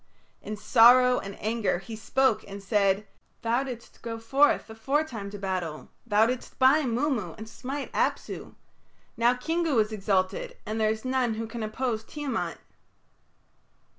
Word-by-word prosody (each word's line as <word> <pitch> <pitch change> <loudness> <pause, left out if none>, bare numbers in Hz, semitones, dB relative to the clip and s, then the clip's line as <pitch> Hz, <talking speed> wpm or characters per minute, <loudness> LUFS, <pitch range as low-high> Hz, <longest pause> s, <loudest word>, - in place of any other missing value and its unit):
In 215 - -6
sorrow 250 +3 +6
and 195 0 -8
anger 220 -3 0
he 220 +5 -8
spoke 245 +2 +1
and 200 0 -8
said, 200 0 +2 0.4
"Thou 235 +2 +2
didst 245 -3 -9
go 230 -1 -5
forth 275 +6 +3
aforetime 225 -1 -2
to 205 - -7
battle; 185 -5 -4 0.2
thou 210 0 +4
didst 250 +1 -4
bind 260 -2 +4
Mummu 245 - -1
and 220 - -8
smite 270 +5 -6
Apsu. - - -2 0.6
Now 240 +1 +3
Kingu 320 +2 0
is 215 0 +2
exalted, 205 - -1
and 220 +1 -2
there 215 - +3
is 220 +2 -3
none 255 -3 +1
who 225 +1 -3
can 230 +1 -6
oppose 220 +1 -2
Tiamat." 275 -2 -3
225 Hz, 145 wpm, -27 LUFS, 210-260 Hz, 0.6 s, sorrow